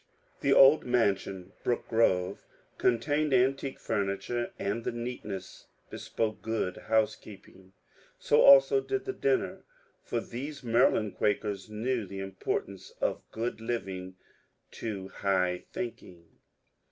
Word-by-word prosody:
The 140 - +1
old 135 +2 +7
mansion, 100 -6 0
^^ - - -31
Brooke 120 - -1
Grroye," 95 -5 +2 0.4
contained 145 +5 +1
an 130 +1 +5
tique 135 0 -6
furniture, 105 +3 -2
and 105 +4 -2
the - - -1
neatness 120 -5 -6 0.2
bespoke 110 -1 -3
good 110 -5 -2
housekeeping. 105 -3 -2 0.4
So 475 -1 +3
also - - +7
did 400 0 -3
the 390 - -3
dinner, 405 -2 0 0.4
for 120 - -2
these 140 +5 -7
Maryland 115 -3 +2
Quakers 105 -1 -1
knew 115 +1 -2
the 95 - -8
importance 95 0 -4
of - - -1
good 115 0 -3
living 95 -6 -4 0.6
to 100 -4 -5
high 90 -2 0
thinking. 95 -8 -7
115 Hz, 120 wpm, -29 LUFS, 100-130 Hz, 0.6 s, old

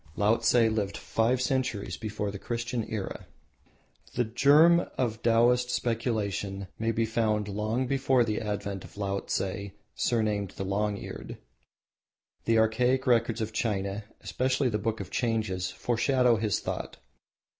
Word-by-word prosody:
Laotse 110 +4 +3
lived 110 -4 +2
five 120 +3 +1
centuries 130 -5 -1
before 105 -2 -4
the 100 - -7
Christian 120 +1 -3
Era. 105 -4 -4 0.9
The 120 - +2
germ 150 +9 +5
of 115 -3 -1
Taoist 120 +2 +3
speculation 105 -5 -2
may 115 0 +1
be 115 0 +1
found 110 -2 0
long 110 +5 -1
before 130 -1 +2
the 110 -1 -1
advent 100 -2 -3
of - - -14
Laotse, 100 -1 -1 0.5
surnamed 105 -5 0
the 95 - -3
Long 100 +1 0
Eared. - - -8 1.1
The 115 0 +3
archaic 125 +4 +2
records 115 -2 +2
of 110 0 -3
China, 100 -2 -2 0.2
especially 130 +1 0
the 105 -2 -1
Book 110 0 -2
of 95 - -8
Changes, 110 -6 -1
foreshadow 120 0 +2
his 105 -1 0
thought. - - -4
110 Hz, 135 wpm, -28 LUFS, 105-120 Hz, 1.1 s, germ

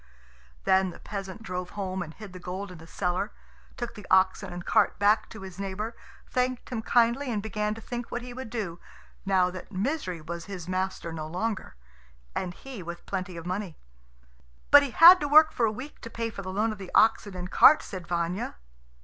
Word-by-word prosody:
Then 190 0 +3
the 175 - -10
peasant 195 +1 -7
drove 180 -3 -4
home 190 -2 -2
and 160 -2 -5
hid 200 +2 -11
the 185 - -8
gold 185 +2 -5
in 180 - -11
the 165 - -13
cellar; 180 +4 -1 0.5
took 240 -1 -4
the 210 -3 -11
oxen 190 0 +3
and 175 0 -7
cart - - +3
back 210 +2 +3
to 220 - -10
his 190 0 -9
neighbour, 200 +4 -4 0.3
thanked 250 0 -1
him 230 -3 -2
kindly, 240 +3 +2
and 215 - 0
began 210 0 -2
to 225 - -10
think 240 +1 -5
what 240 - -4
he 245 0 -8
would 260 -2 -7
do, 200 -7 -4 0.5
now 185 -2 +3
that 185 - -9
Misery 195 - -2
was 170 +2 -6
his 185 -4 -7
master 185 -2 -2
no 155 -1 -5
longer, 190 - -3 0.6
and 175 -1 -3
he 265 -7 -9
with 170 0 -8
plenty 185 -2 -4
of 165 - -8
money. 185 -2 -4 0.9
"But 285 - +10
he 280 - -2
had 345 +8 +9
to 290 - -1
work 310 +2 +7
for 230 - +1
a - - 0
week 255 +7 -9
to 230 - -7
pay 230 0 -3
for 200 - -7
the 185 -1 -6
loan 215 +4 +1
of 215 - -7
the 190 -2 -8
oxen 215 -3 +4
and 180 0 -6
cart," 305 +1 +7
said 185 -3 -7
Vanya. 175 +5 -2
195 Hz, 210 wpm, -28 LUFS, 180-230 Hz, 0.9 s, But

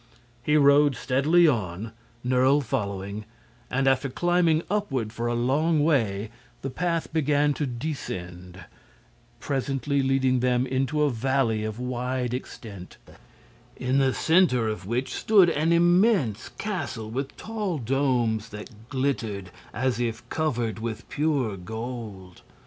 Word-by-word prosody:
He 150 +5 +2
rode 140 -1 +5
steadily 155 +8 +3
on, 105 - -1 0.3
Nerle 130 +3 +4
following, 100 -4 -3 0.5
and 135 +1 0
after 135 +1 +2
climbing 175 +1 +2
upward 135 - -1
for 115 +1 -2
a 120 - 0
long 145 +6 +2
way 110 -9 +1 0.3
the 135 - -3
path 165 +3 -2
began 145 -1 +2
to 145 0 -2
descend, 90 - -6 0.7
presently 135 0 -1
leading 130 -1 +2
them 125 0 +2
into 135 +4 0
a 145 - +2
valley 120 -2 0
of 110 0 -4
wide 125 0 -2
extent, 105 -7 -8 0.8
in 130 +2 +1
the 135 -1 +3
center 160 -8 +3
of 110 -3 -4
which 125 +4 -2
stood 195 -6 +4
an 160 +2 +1
immense 175 - +3
castle 140 - -4
with 135 +3 -4
tall 210 -6 -3
domes 120 -4 0
that 105 +2 -11
glittered 115 -9 -2 0.2
as 125 - -1
if 120 0 -3
covered 120 -9 -1
with 115 -1 -5
pure 140 -8 0
gold. 105 -2 -7
130 Hz, 125 wpm, -26 LUFS, 110-145 Hz, 0.8 s, rode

